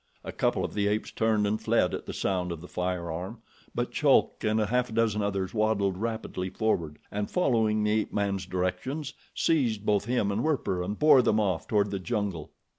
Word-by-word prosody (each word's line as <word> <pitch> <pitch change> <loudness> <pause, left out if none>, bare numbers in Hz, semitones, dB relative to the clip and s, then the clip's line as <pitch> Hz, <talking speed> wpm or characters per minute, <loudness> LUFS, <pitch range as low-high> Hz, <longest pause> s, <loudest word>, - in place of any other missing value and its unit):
A - - -5
couple - - 0
of - - -6
the 100 -1 +1
apes 105 +1 -1
turned 110 -2 +1
and 105 +1 0
fled 110 -5 +2
at - - -5
the - - -3
sound 90 -2 -1
of 85 - -5
the 90 - -10
firearm; 90 +4 -4 0.3
but - - -1
Chulk - - +3
and 110 +1 +2
a 105 - +2
half 125 +3 0
dozen 110 -2 +1
others 100 -2 -2
waddled 105 -3 +1
rapidly 110 -3 -3
forward, 90 -7 -1
and, 105 0 -2
following 110 -10 +2
the 105 - +2
ape 110 0 0
man's 100 -2 -1
directions, 130 +12 -2 0.2
seized 120 -10 +1
both 105 -1 +2
him 115 -4 +1
and 105 +4 -1
Werper 140 - 0
and 100 +4 -3
bore 150 -3 +7
them 110 -3 +2
off 95 -6 0
toward 105 -2 +1
the 100 - -2
jungle. 100 -6 -3
105 Hz, 195 wpm, -28 LUFS, 95-110 Hz, 0.3 s, bore